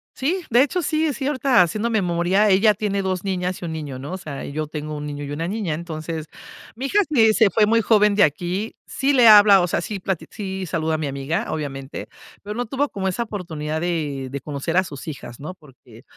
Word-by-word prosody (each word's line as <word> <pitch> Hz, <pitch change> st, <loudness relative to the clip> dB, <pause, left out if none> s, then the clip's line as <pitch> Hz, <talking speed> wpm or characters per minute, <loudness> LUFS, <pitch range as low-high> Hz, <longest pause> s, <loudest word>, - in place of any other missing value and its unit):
Sí, 345 Hz, +7 st, -1 dB
de 240 Hz, +3 st, +5 dB
hecho, 345 Hz, +6 st, -1 dB
sí, 310 Hz, +1 st, 0 dB
es 290 Hz, -, -1 dB
cierta, 270 Hz, -5 st, +2 dB
haciendo 215 Hz, +7 st, 0 dB
memoria. 190 Hz, 0 st, +2 dB
Ella 205 Hz, +3 st, +5 dB
tiene 200 Hz, -1 st, -1 dB
2, 185 Hz, -1 st, -2 dB
niñas 185 Hz, -2 st, -2 dB
y -, -, -5 dB
1, 165 Hz, -, -4 dB
niño, 145 Hz, -5 st, -6 dB
¿no? 145 Hz, +7 st, -6 dB
O 190 Hz, -, -3 dB
sea, 150 Hz, -7 st, -7 dB
y -, -, -7 dB
yo 155 Hz, +1 st, -3 dB
tengo 150 Hz, 0 st, -5 dB
1, 145 Hz, -, -5 dB
niño 145 Hz, 0 st, -5 dB
y 145 Hz, -, -6 dB
1, 145 Hz, -, -5 dB
niña. 200 Hz, -7 st, -2 dB
Entonces, 160 Hz, -1 st, -5 dB, 0.5 s
mi 255 Hz, +4 st, -5 dB
hija 415 Hz, -, +2 dB
sí 225 Hz, -7 st, +4 dB
se 220 Hz, -3 st, +4 dB
fue 215 Hz, +1 st, +3 dB
muy 230 Hz, +2 st, +3 dB
joven 210 Hz, -2 st, +4 dB
de 205 Hz, -, +5 dB
aquí. 175 Hz, +8 st, -1 dB
Sí 275 Hz, +2 st, 0 dB
le 250 Hz, -4 st, +6 dB
habla, 205 Hz, -3 st, +8 dB
o 175 Hz, -, +1 dB
sea, 170 Hz, -, -1 dB
sí 200 Hz, +2 st, -5 dB
plati 185 Hz, -2 st, -3 dB
sí 190 Hz, -2 st, -5 dB
saluda 160 Hz, -2 st, -1 dB
a -, -, -1 dB
mi 155 Hz, -2 st, -2 dB
amiga, 140 Hz, +10 st, -2 dB
obviamente, 135 Hz, -3 st, -5 dB, 0.3 s
pero 210 Hz, +1 st, -6 dB
no 245 Hz, -, -2 dB
tuvo 275 Hz, +5 st, -1 dB
como 190 Hz, -2 st, -3 dB
esa 190 Hz, +6 st, -1 dB
oportunidad 160 Hz, -8 st, -4 dB
de 150 Hz, -6 st, -2 dB
de 140 Hz, -, -5 dB
conocer 150 Hz, +3 st, -3 dB
a 185 Hz, -, +5 dB
sus 145 Hz, -3 st, -9 dB
hijas, 135 Hz, -5 st, -8 dB
¿no? 155 Hz, +6 st, -6 dB
Porque 130 Hz, -8 st, -18 dB
185 Hz, 235 wpm, -22 LUFS, 155-215 Hz, 0.5 s, habla